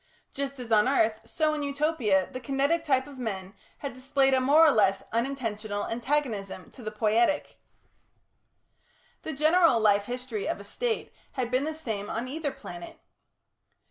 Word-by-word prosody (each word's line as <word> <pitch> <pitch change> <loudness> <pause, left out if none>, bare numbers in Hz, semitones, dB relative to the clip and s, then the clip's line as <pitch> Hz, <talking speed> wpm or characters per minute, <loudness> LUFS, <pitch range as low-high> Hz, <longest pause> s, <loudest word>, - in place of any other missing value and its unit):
Just 275 0 -3
as 240 -2 -7
on 215 +1 +5
earth, 220 -5 +2
so 305 +7 0
in 300 - -2
Utopia, 280 - +1
the 255 - -5
kinetic 275 +6 +1
type 265 -4 +2
of 280 -2 -12
men 195 -5 -4 0.2
had 280 -2 -5
displayed 270 +1 +2
a 260 - +4
more 295 +5 +6
or 310 - +6
less 195 -5 +2
unintentional 225 -4 -2
antagonism 230 -6 -2
to 255 - -13
the 215 - -4
poietic. 225 +6 +1 1.6
The 315 - -5
general 310 -2 +4
life 205 -2 +3
history 245 -3 -4
of - - -2
a - - -9
State 450 - -3 0.2
had 250 -3 -2
been 255 +3 +1
the 315 - -2
same 220 -9 -4
on 235 +3 -3
either 295 +2 -2
planet. 175 -7 -10
255 Hz, 160 wpm, -28 LUFS, 215-285 Hz, 1.6 s, more